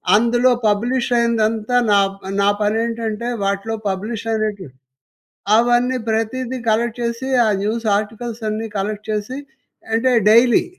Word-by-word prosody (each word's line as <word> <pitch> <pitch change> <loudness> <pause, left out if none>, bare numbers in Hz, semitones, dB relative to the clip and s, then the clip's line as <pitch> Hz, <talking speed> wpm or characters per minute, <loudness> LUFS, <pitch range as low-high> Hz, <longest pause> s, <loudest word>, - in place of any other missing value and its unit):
అందులో 240 +3 +3 0.2
పబ్లిష్ 235 +5 0
అయిందంతా 225 0 0 0.2
నా 205 - +5 0.4
నా 200 - +3
పనేంటంటే 225 +1 -1 0.2
వాటిలో 200 +3 -1
పబ్లిష్ 205 +4 -4
అయినట్టు 215 -3 -2 0.9
అవన్నీ 245 +2 +2
ప్రతీదీ 235 +3 -2
కలెక్ట్ 230 +2 0
చేసి 235 +2 -3 0.2
ఆ - - +2
న్యూస్ 225 +3 -2
ఆర్టికల్స్ 225 +2 -5
అన్నీ 215 +1 -3
కలెక్ట్ 210 +2 -4
చేసి 215 +5 -3 0.6
అంటే 240 +3 +2 0.2
డైలీ 235 +2 +5
225 Hz, 115 wpm, -19 LUFS, 215-240 Hz, 0.9 s, నా